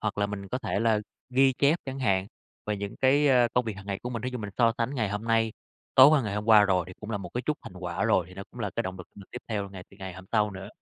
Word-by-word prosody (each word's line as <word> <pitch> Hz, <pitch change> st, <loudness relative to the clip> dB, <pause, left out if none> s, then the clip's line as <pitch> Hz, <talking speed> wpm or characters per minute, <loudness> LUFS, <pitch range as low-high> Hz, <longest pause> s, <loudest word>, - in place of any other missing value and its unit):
Hoặc 105 Hz, -1 st, -2 dB
là 100 Hz, -, +2 dB
mình 100 Hz, -1 st, -6 dB
có 125 Hz, -, -2 dB
thể 105 Hz, -, -2 dB
là 110 Hz, -2 st, +3 dB, 0.3 s
ghi 135 Hz, +1 st, +4 dB
chép 145 Hz, +5 st, +4 dB
chẳng 135 Hz, 0 st, -5 dB
hạn, 95 Hz, -6 st, +1 dB, 0.4 s
về 105 Hz, -1 st, -1 dB
những 100 Hz, 0 st, -6 dB
cái, 140 Hz, +2 st, +4 dB
ờ, 125 Hz, -2 st, +5 dB
công 125 Hz, -1 st, +3 dB
việc 110 Hz, -4 st, -4 dB
hằng 95 Hz, -, -11 dB
ngày 100 Hz, -1 st, -3 dB
của 125 Hz, -, -4 dB
mình, 115 Hz, -3 st, -4 dB
thí 125 Hz, -, -2 dB
dụ 125 Hz, -, -3 dB
mình 105 Hz, -2 st, -5 dB
so 115 Hz, -1 st, +5 dB
sánh 120 Hz, +4 st, -1 dB
ngày 110 Hz, -6 st, 0 dB
hôm 105 Hz, +2 st, -4 dB
nay, 115 Hz, -1 st, +2 dB, 0.4 s
tối 130 Hz, +1 st, +10 dB
qua, 150 Hz, -4 st, +4 dB
ngày 105 Hz, -2 st, -3 dB
hôm 105 Hz, 0 st, -2 dB
qua 110 Hz, -2 st, +7 dB
rồi, 95 Hz, -3 st, +2 dB
thì -, -, -9 dB
cũng 105 Hz, +1 st, -7 dB
là 105 Hz, -, -1 dB
một 100 Hz, -, -7 dB
cái 125 Hz, -, -1 dB
chút 150 Hz, -1 st, 0 dB
thành -, -, -10 dB
quả 90 Hz, -1 st, -2 dB
rồi 90 Hz, -, +3 dB
thì 90 Hz, -, -13 dB
nó 95 Hz, -, -7 dB
cũng -, -, -11 dB
là -, -, -2 dB
cái -, -, +1 dB
động 95 Hz, 0 st, -5 dB
lực 90 Hz, -, -9 dB
mình 100 Hz, -1 st, -12 dB
tiếp -, -, -6 dB
theo 105 Hz, -3 st, -2 dB
ngày 95 Hz, -2 st, -9 dB
từ 95 Hz, -, -17 dB
ngày 95 Hz, -1 st, -7 dB
hôm 95 Hz, +1 st, -11 dB
sau 105 Hz, -2 st, +2 dB
nữa 95 Hz, -1 st, -8 dB
105 Hz, 325 wpm, -27 LUFS, 100-125 Hz, 0.4 s, tối